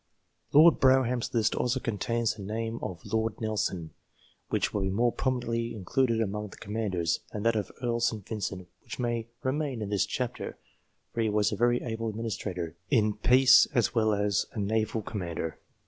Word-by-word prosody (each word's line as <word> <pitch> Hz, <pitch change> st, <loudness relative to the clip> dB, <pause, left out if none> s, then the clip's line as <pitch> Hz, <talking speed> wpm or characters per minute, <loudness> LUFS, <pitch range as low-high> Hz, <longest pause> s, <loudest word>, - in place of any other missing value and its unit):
Lord 160 Hz, +3 st, +7 dB
Brougham's 130 Hz, -3 st, +3 dB
list 110 Hz, -2 st, +2 dB
also 125 Hz, +1 st, 0 dB
contains 115 Hz, 0 st, -1 dB
the 105 Hz, -, -11 dB
name 115 Hz, +3 st, -3 dB
of 85 Hz, -3 st, -6 dB
Lord 110 Hz, +1 st, -1 dB
Nelson, 100 Hz, -7 st, -2 dB, 0.6 s
which -, -, 0 dB
will 105 Hz, -, 0 dB
be 95 Hz, -, 0 dB
more 120 Hz, +5 st, +2 dB
properly 115 Hz, -3 st, -1 dB
included 115 Hz, +4 st, +1 dB
among 105 Hz, 0 st, -2 dB
the 95 Hz, -, -13 dB
Commanders; 100 Hz, -6 st, -1 dB
and 105 Hz, +1 st, -5 dB
that 115 Hz, 0 st, +3 dB
of 105 Hz, -2 st, -2 dB
Earl 120 Hz, -1 st, 0 dB
St. 110 Hz, -4 st, -1 dB
Vincent, 100 Hz, -4 st, -4 dB
which -, -, -8 dB
may 120 Hz, -2 st, -2 dB, 0.2 s
remain 135 Hz, -1 st, -1 dB
in 105 Hz, -2 st, -4 dB
this 100 Hz, -3 st, +1 dB
chapter, -, -, -4 dB, 0.6 s
for 115 Hz, -, -1 dB
he 110 Hz, -, +2 dB
was 105 Hz, 0 st, +2 dB
a -, -, -1 dB
very 120 Hz, +1 st, +2 dB
able 115 Hz, -1 st, -3 dB
adminis 115 Hz, 0 st, -3 dB
trator 90 Hz, -4 st, -4 dB, 0.2 s
in 110 Hz, -6 st, +3 dB
peace 130 Hz, +4 st, +6 dB
as 120 Hz, -, +2 dB
well 110 Hz, -2 st, +3 dB
as 100 Hz, 0 st, +1 dB
a 110 Hz, -, -4 dB
naval 110 Hz, +1 st, 0 dB
commander. 85 Hz, -6 st, -4 dB
110 Hz, 180 wpm, -29 LUFS, 105-120 Hz, 0.6 s, Lord